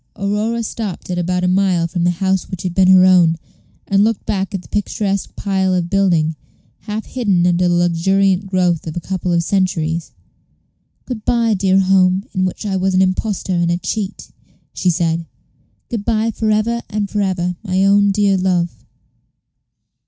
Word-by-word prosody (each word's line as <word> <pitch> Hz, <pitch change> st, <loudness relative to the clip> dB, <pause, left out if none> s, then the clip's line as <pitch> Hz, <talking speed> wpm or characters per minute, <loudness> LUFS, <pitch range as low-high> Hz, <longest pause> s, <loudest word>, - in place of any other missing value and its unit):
Aurora 210 Hz, +4 st, -1 dB
stopped 210 Hz, -4 st, -5 dB
at 180 Hz, -, -1 dB
about 180 Hz, +1 st, -1 dB
a -, -, +2 dB
mile 185 Hz, -2 st, +2 dB
from 170 Hz, 0 st, -2 dB
the -, -, +4 dB
house 190 Hz, +1 st, -1 dB
which 185 Hz, -2 st, -6 dB
had 180 Hz, -2 st, -3 dB
been 185 Hz, 0 st, +3 dB
her 185 Hz, 0 st, +7 dB
own, 175 Hz, -3 st, +4 dB, 0.5 s
and 200 Hz, 0 st, +3 dB
looked 225 Hz, -1 st, 0 dB
back 195 Hz, -1 st, -2 dB
at 185 Hz, -, -5 dB
the -, -, -16 dB
picturesque 200 Hz, -1 st, -2 dB
pile 190 Hz, -2 st, 0 dB
of 175 Hz, -1 st, -2 dB
building, 170 Hz, -5 st, +2 dB, 0.4 s
half 215 Hz, +1 st, -5 dB
hidden 200 Hz, -9 st, 0 dB
under 180 Hz, 0 st, +2 dB
the 175 Hz, -, +2 dB
luxuriant 190 Hz, +3 st, +1 dB
growth 180 Hz, -4 st, 0 dB
of 160 Hz, -, -5 dB
a -, -, 0 dB
couple 185 Hz, 0 st, -3 dB
of 170 Hz, -1 st, +2 dB
centuries. 170 Hz, -3 st, -1 dB, 1.0 s
"Good 235 Hz, -4 st, -6 dB
by, 230 Hz, -2 st, +2 dB
dear 190 Hz, -1 st, +2 dB
home, 190 Hz, +1 st, +3 dB
in 185 Hz, -2 st, 0 dB
which 185 Hz, +3 st, -4 dB
I 195 Hz, -2 st, -1 dB
was 190 Hz, 0 st, 0 dB
an 185 Hz, -, +4 dB
impostor 190 Hz, 0 st, -1 dB
and 170 Hz, -1 st, +1 dB
a 170 Hz, -, +1 dB
cheat," 200 Hz, +2 st, -5 dB, 0.4 s
she 180 Hz, -, 0 dB
said; 165 Hz, -1 st, 0 dB, 0.6 s
"good 230 Hz, -5 st, -4 dB
by 225 Hz, 0 st, 0 dB
for 220 Hz, 0 st, -2 dB
ever 220 Hz, +2 st, +1 dB
and 210 Hz, -2 st, -2 dB
for 205 Hz, +1 st, -2 dB
ever, 180 Hz, -2 st, -1 dB
my 190 Hz, -1 st, +1 dB
own 200 Hz, 0 st, +4 dB
dear 200 Hz, -1 st, +2 dB
love." 180 Hz, -2 st, -1 dB
190 Hz, 180 wpm, -18 LUFS, 175-200 Hz, 1.0 s, her